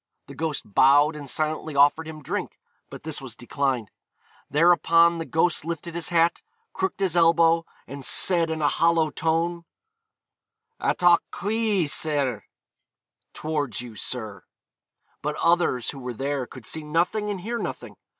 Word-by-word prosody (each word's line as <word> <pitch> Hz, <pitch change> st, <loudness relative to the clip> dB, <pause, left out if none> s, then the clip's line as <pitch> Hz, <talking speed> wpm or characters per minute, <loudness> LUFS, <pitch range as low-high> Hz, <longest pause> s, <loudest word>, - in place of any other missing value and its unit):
The 140 Hz, -, -11 dB
ghost 150 Hz, 0 st, -3 dB
bowed 145 Hz, +8 st, +4 dB
and 145 Hz, -2 st, -7 dB
silently 155 Hz, 0 st, -2 dB
offered 145 Hz, +3 st, +4 dB
him 155 Hz, -2 st, -9 dB
drink; -, -, -4 dB, 0.3 s
but -, -, -10 dB
this 155 Hz, -2 st, -3 dB
was 130 Hz, -4 st, -7 dB
declined. 125 Hz, -3 st, -2 dB, 0.6 s
Thereupon 170 Hz, +1 st, +4 dB
the 165 Hz, -, -4 dB
ghost 165 Hz, 0 st, +1 dB
lifted 170 Hz, +1 st, -5 dB
his 170 Hz, -1 st, -2 dB
hat, 170 Hz, 0 st, +2 dB, 0.3 s
crooked 190 Hz, 0 st, -2 dB
his 185 Hz, -3 st, 0 dB
elbow, 165 Hz, 0 st, +4 dB, 0.2 s
and 140 Hz, 0 st, -9 dB
said 170 Hz, +3 st, +3 dB
in 160 Hz, -1 st, -3 dB
a -, -, +4 dB
hollow 165 Hz, 0 st, +2 dB
tone, 165 Hz, +2 st, -1 dB, 1.2 s
'Attoch 175 Hz, -1 st, +4 dB
chwi, 205 Hz, -3 st, 0 dB
syr,' 140 Hz, -, -1 dB, 0.9 s
(towards 150 Hz, -6 st, -2 dB
you, 120 Hz, -3 st, -10 dB
sir). 105 Hz, -5 st, -4 dB, 0.8 s
But 150 Hz, +1 st, -2 dB
others 170 Hz, -9 st, +1 dB
who 140 Hz, -, -10 dB
were 125 Hz, -2 st, -6 dB
there 135 Hz, 0 st, -2 dB
could 130 Hz, -, -12 dB
see 160 Hz, -, -3 dB
nothing 175 Hz, +8 st, -1 dB
and 195 Hz, -3 st, -4 dB
hear 235 Hz, +5 st, -3 dB
nothing. -, -, -6 dB
160 Hz, 145 wpm, -24 LUFS, 140-170 Hz, 1.2 s, bowed